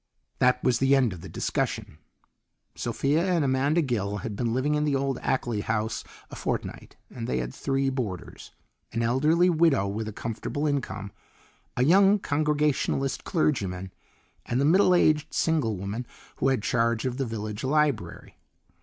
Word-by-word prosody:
That 125 0 +3
was 125 -2 +2
the 135 +1 +4
end 125 -7 +2
of 85 - -10
the 95 - -9
discussion. 75 - -3 0.7
Sophia 140 +7 0
and 175 -5 +1
Amanda 140 +5 +2
Gill 105 -6 -1
had 110 -3 -4
been 115 +2 -1
living 130 +5 +1
in 150 0 +1
the 145 -2 +1
old 135 -1 -1
Ackley 120 -5 -1
house 110 +1 -2 0.3
a - - -7
fortnight, - - -4 0.2
and 115 -2 -6
they 65 - -1
had 60 0 -3
three 135 -1 0
boarders: 110 -9 -5 0.4
an 115 +1 0
elderly 150 +9 +3
widow 160 - +3
with 105 +2 -3
a - - -4
comfortable 115 +7 -4
income, 125 -9 -2 0.7
a 125 - +3
young 195 +7 +5
congregationalist 150 -4 0
clergyman, 95 - -1 0.5
and 120 - 0
the 140 - +2
middle 180 +3 +5
aged 155 -3 +2
single 145 - +1
woman 100 +6 -5 0.3
who - - +1
had 130 -6 +1
charge 115 0 +1
of 125 -1 -2
the 135 - -1
village 105 -2 -5
library. 145 -4 -1
130 Hz, 160 wpm, -26 LUFS, 110-150 Hz, 0.7 s, young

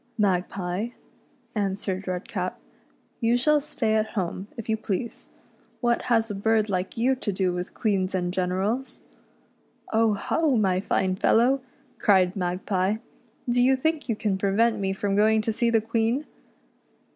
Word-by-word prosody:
" - - -40
Magpie," 180 +2 -2 0.7
answered 195 -2 -2
Redcap, 185 0 -3 0.3
" - - -39
you 235 +1 +3
shall 300 +4 +3
stay 225 -6 -1
at 215 0 +2
home, 190 -1 -3
if 230 - -6
you 220 - +2
please. 220 +2 -4 0.5
What 240 -1 +1
has 225 -2 +2
a - - -2
bird 215 +1 +1
like 185 +2 -2
you 250 +3 +3
to 215 - -2
do 185 -1 0
with 180 0 -5
queens 195 -3 0
and 180 -1 -1
generals! 190 +8 -1 0.3
" - - -37
" - - -17
Oh, 220 -1 +3
ho, 295 +7 +1
my 190 -4 +2
fine 185 -1 0
fellow," 250 +7 +3 0.4
cried 190 -3 +4
Magpie, 185 +1 0 0.3
" 235 +1 -36
do 245 0 +2
you 260 +2 +5
think 310 +1 -1
you 225 - +1
can 210 -3 -1
prevent 210 +4 +2
me 195 -1 0
from 195 +1 -1
going 220 +2 +4
to 225 - 0
see 235 +2 +1
the 225 -1 +3
Queen. 230 +5 0
210 Hz, 170 wpm, -26 LUFS, 190-230 Hz, 0.7 s, you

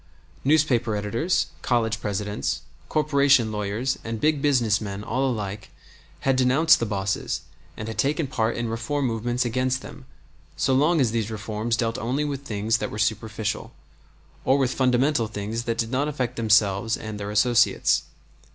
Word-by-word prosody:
Newspaper 130 -6 +2
editors, 115 - 0 0.2
college 115 -3 0
presidents, 105 0 -2 0.3
corporation 140 -6 +3
lawyers, 105 +5 -2
and 115 -1 -4
big 150 +1 +2
business 120 -8 +2
men, 100 -1 -5
all 130 +5 0
alike, 105 -4 -4 0.5
had 135 -1 +2
denounced 130 +6 +4
the 115 - -1
bosses 100 -1 -2 0.4
and 110 - -5
had 110 - -6
taken 150 +3 +1
part 115 -4 -1
in 120 0 -2
reform 115 +6 -2
movements 120 +1 -1
against 130 +2 0
them - - -11 0.5
so 130 - +2
long 155 +5 +3
as 125 -5 +2
these 115 -2 -1
reforms 110 +1 -2
dealt 115 -1 -1
only 130 +6 -1
with 140 -2 -4
things 110 -2 0
that - - -2
were - - -7
superficial, 110 0 -2 0.7
or 135 - +3
with 130 -2 +1
fundamental 130 -1 +2
things 110 +2 -4
that 115 -1 -1
did 115 0 -1
not 135 +3 +1
affect 135 -5 -2
themselves 110 -1 +2
and 110 -1 -6
their 100 0 -4
associates. 120 +3 +3
115 Hz, 160 wpm, -24 LUFS, 110-130 Hz, 0.7 s, denounced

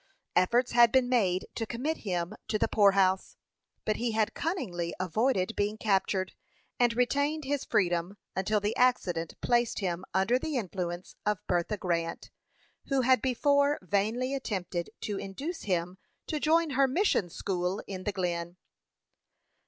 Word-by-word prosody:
Efforts 235 +8 +3
had 235 -1 +6
been 260 -2 +4
made 195 -8 +2
to 225 - -3
commit 280 +9 -2
him 180 -2 -3
to 215 - 0
the - - +1
poorhouse; 195 -2 +3 0.5
but 215 - 0
he 235 -1 -1
had 215 -1 +1
cunningly 190 - -3
avoided 215 +2 0
being 205 +1 0
captured, 195 -3 0 0.5
and 240 -1 +3
retained 285 +5 +1
his 285 0 -1
freedom 175 0 0 0.2
until 210 +3 +1
the 205 +2 -1
accident 180 -10 +1
placed 240 -1 +2
him 180 -3 -2
under 190 +7 +2
the 305 -1 -2
influence 180 -4 -4
of 210 -1 -1
Bertha 175 +4 0
Grant, 170 -3 -2 0.6
who 275 -1 +2
had 255 +1 +4
before 280 +3 +2
vainly 220 +8 0
attempted 185 -9 -3
to 205 -2 -3
induce 285 - -5
him 180 -1 -1 0.3
to 305 - -2
join 320 +1 +3
her 270 +1 +3
mission 265 - +1
school 180 +2 -2
in 185 -2 -6
the 205 - -1
Glen. 175 -2 -3
210 Hz, 145 wpm, -29 LUFS, 185-255 Hz, 0.6 s, had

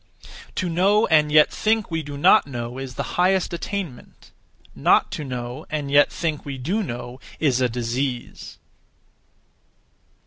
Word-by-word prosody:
To 185 - -1
know 195 +6 +3
and 150 -1 +4
yet 150 0 +6
(think) 220 -3 0
we 165 0 -1
do 145 -1 -8
not 185 +4 +5
know 120 -1 -5
is 135 -2 -7
the - - -5
highest 185 -1 +2
(attainment); 170 -6 -6 0.4
not - - +3
to 150 - -4
know 125 -2 -6
(and 145 -2 -3
yet 145 0 +5
think) 160 -4 -3
we 140 -2 -6
do 180 - -1
know 120 - -6 0.2
is 130 -5 +2
a 125 - +2
disease. 120 +2 -4
145 Hz, 145 wpm, -23 LUFS, 125-175 Hz, 0.4 s, yet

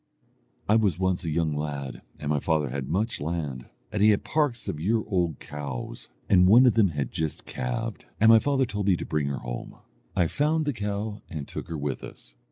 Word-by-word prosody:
"I 110 - +5
was 100 -7 +2
once 95 -1 0
a - - -1
young 80 -1 0
lad, 70 -3 -4 0.2
and 75 0 -3
my 75 - +2
father 75 -3 0
had 70 0 -4
much 105 +5 0
land, 75 -5 -3 0.2
and 105 0 -1
he 105 - +7
had 105 - +3
parks 145 -7 0
of 75 - -3
year 110 +6 +1
old 90 -7 0
cows, 70 -4 -6 0.2
and 90 -1 +6
one 120 +7 +8
of 125 - +6
them 110 -3 +5
had 70 -7 -3
just 80 -2 -3
calved, 60 -1 -4
and 110 - +6
my 115 - +8
father 135 +1 +2
told 105 -3 -3
me 95 -3 +4
to - - -5
bring 75 -2 -1
her 70 -1 -2
home. - - -6 0.4
I 90 - +3
found 150 - +1
the 145 - 0
cow, 105 0 -3
and 75 -4 -5
took - - -6
her 85 - -4
with 70 -2 -3
us. - - -12
85 Hz, 215 wpm, -27 LUFS, 75-105 Hz, 0.4 s, one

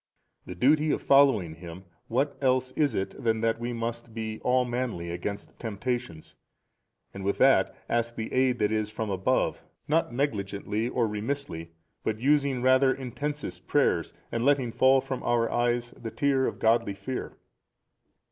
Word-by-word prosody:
The 90 - -6
duty 150 - +3
of - - +1
following 135 - +4
Him, 85 +2 -10 0.2
what 135 +5 0
else 130 -1 +2
is 145 0 +1
it 95 - -4
than 110 -1 +1
that 115 0 +1
we 120 +1 -3
must 115 0 -5
be 110 -1 -4
all 125 0 +2
manly 120 -9 -3
against 100 +4 -6
temptations, 115 -6 -4 0.8
and 100 - -7
with 100 +1 0
that, - - +4
ask 115 0 0
the 110 - -5
aid 130 -1 +3
that 105 -2 +1
is 110 -1 0
from 110 -1 -4
above 95 0 0 0.2
not 160 -1 +1
negligently 110 -3 -2
nor 120 -2 +1
remissly 105 -6 -4 0.3
but 110 0 -2
using 140 -1 +2
rather 130 +1 +5
intensest 140 +3 -5
prayers 90 - +2 0.2
and 115 - -1
letting 135 -3 +2
fall 130 +3 +4
from 130 -1 -4
our 120 -1 +1
eyes 120 0 0
the 115 - -7
tear 135 +1 +1
of - - -4
godly 115 -2 +2
fear? 125 +7 -5
120 Hz, 155 wpm, -27 LUFS, 105-130 Hz, 0.8 s, rather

